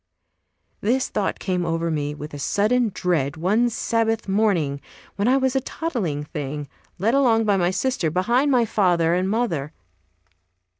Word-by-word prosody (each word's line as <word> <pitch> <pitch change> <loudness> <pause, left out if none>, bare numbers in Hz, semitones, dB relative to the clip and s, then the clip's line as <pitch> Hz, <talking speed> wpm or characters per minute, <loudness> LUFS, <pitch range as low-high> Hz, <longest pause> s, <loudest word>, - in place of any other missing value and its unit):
This 250 +5 0
thought 205 - -1
came 180 -2 -1
over 165 0 -1
me 150 -1 -2
with 150 0 -8
a 145 - -6
sudden 225 - +1
dread 160 -7 -1
one 210 +9 +2
Sabbath 225 -1 -1
morning 190 -9 +1 0.3
when 205 +2 0
I 260 +2 +4
was 265 -1 0
a 265 - +2
toddling 230 - -3
thing, 145 -1 -5 0.3
led 220 +6 +1
along 235 -5 +3
by 205 -2 +3
my 175 -2 +2
sister, 190 -3 0
behind 235 - +1
my 250 -4 +3
father 175 -6 +2
and 185 +2 0
mother. 170 - -1
195 Hz, 155 wpm, -23 LUFS, 165-235 Hz, 0.3 s, I